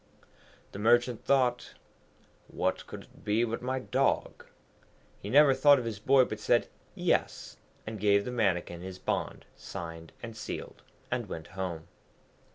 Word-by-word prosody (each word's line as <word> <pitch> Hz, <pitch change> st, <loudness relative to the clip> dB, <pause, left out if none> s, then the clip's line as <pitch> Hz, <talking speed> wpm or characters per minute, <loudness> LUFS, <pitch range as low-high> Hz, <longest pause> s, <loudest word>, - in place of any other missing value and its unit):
The 100 Hz, -, -8 dB
Merchant 120 Hz, +2 st, +3 dB
thought, 125 Hz, -3 st, +1 dB, 0.7 s
'What -, -, -2 dB
could -, -, -8 dB
it -, -, -21 dB
be 105 Hz, +2 st, +2 dB
but 115 Hz, -1 st, -2 dB
my 130 Hz, +1 st, -2 dB
dog?' 130 Hz, +1 st, -1 dB, 0.7 s
He 100 Hz, -, -7 dB
never 140 Hz, +3 st, +6 dB
thought 145 Hz, +1 st, +6 dB
of 125 Hz, -, -3 dB
his 110 Hz, -3 st, -4 dB
boy, 130 Hz, +4 st, +5 dB
but 110 Hz, -, -6 dB
said 120 Hz, +2 st, +2 dB, 0.3 s
Yes, -, -, -1 dB, 0.3 s
and 110 Hz, -1 st, -6 dB
gave 100 Hz, 0 st, +3 dB
the 125 Hz, -, -3 dB
Mannikin 90 Hz, -7 st, 0 dB
his 95 Hz, 0 st, -7 dB
bond -, -, -3 dB
signed 80 Hz, -1 st, -8 dB
and 115 Hz, -1 st, -7 dB
sealed, 110 Hz, -, -7 dB, 0.3 s
and -, -, -2 dB
went 80 Hz, -1 st, -7 dB
home. 90 Hz, -4 st, -5 dB
110 Hz, 150 wpm, -30 LUFS, 95-125 Hz, 0.7 s, never